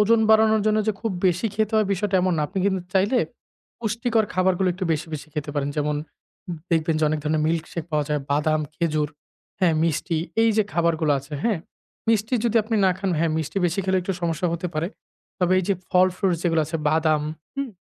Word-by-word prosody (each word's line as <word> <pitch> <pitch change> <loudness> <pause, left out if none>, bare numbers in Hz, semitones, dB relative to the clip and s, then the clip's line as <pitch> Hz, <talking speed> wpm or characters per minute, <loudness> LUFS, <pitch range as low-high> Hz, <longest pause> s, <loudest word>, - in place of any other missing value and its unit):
ওজন 225 +2 +4
বাড়ানোর 220 -1 +5
জন্য 215 0 +3
যে 215 - +3
খুব 225 - -1 0.2
বেশি 180 +4 +1
খেতে 215 +1 0
হবে 215 -2 +3
বিষয়টা 195 0 0
এমন 185 0 +2
না। - - 0
আপনি 190 +5 -4
কিন্তু 190 -2 +1
চাইলে 205 +7 +3 0.6
পুষ্টিকর 225 0 0
খাবারগুলো 185 0 +2
একটু 185 - -4
বেশি, 155 +2 -2
বেশি 150 +1 -7
খেতে 150 -1 -3
পারেন। 145 -1 -1
যেমন 150 0 0 0.7
দেখবেন 165 -1 +2
যে 155 - +2
অনেক 155 0 0
ধরনের 155 0 0
মিল্কশেক 165 0 -2
পাওয়া 150 -1 +1
যায়। 150 -1 0
বাদাম, 155 +2 +2
খেজুর, 155 -3 0 0.5
হ্যাঁ? 175 -4 +4
মিষ্টি 165 0 0 0.2
এই 225 - +5
যে 215 - +5
খাবারগুলো 165 -3 +2
আছে, 140 +3 -12
হ্যাঁ? 225 -6 +2 0.5
মিষ্টি 225 +2 +2
যদি 235 -1 +2
আপনি 220 +1 -1
না 190 - +5
খান, 195 -1 -1
হ্যাঁ 165 -1 +2
মিষ্টি 155 +3 -2
বেশি 175 +3 -1
খেলে 190 0 +2
একটু 190 +2 -2
সমস্যা 170 +1 0
হতে 175 +1 -3
পারে। 155 +3 -1 0.5
তবে 180 -1 +2
এই 185 - 0
যে 200 - +3 0.2
ফল 185 -1 +5
ফ্রুটস 185 -4 +1
যেগুলো 165 -2 +2
আছে 160 +2 -2
বাদাম 155 -1 +2 0.3
হুম? 275 -1 -2
175 Hz, 200 wpm, -24 LUFS, 155-210 Hz, 0.7 s, বাড়ানোর